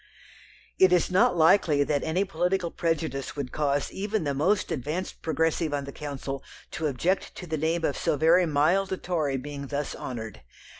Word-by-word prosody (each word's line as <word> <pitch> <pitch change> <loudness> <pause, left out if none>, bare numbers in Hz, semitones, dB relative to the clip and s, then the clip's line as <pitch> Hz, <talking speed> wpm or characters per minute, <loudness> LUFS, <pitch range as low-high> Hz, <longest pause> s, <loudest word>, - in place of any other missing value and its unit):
It 190 -1 +6
is 180 0 +3
not 180 -1 +4
likely 160 -3 +4
that 145 -1 0
any 175 +5 0
political 180 -1 -1
prejudice 160 -5 -2
would 140 -4 -4
cause 145 -1 0
even 205 0 -2
the 145 -2 -1
most 185 +8 +1
advanced 155 +7 -4
Progressive 160 -1 0
on 140 - -2
the 140 - -7
Council 140 -2 -5 0.3
to 160 - -2
object 165 +8 -1
to 180 - -7
the 160 -2 -2
name 160 +2 0
of 140 - 0
so - - 0
very 170 +4 +4
mild 160 +6 +2
a 190 - -1
Tory 155 -8 -1
being 140 +1 -6
thus 145 +1 -3
honoured. 110 - -6
160 Hz, 180 wpm, -27 LUFS, 145-180 Hz, 0.3 s, It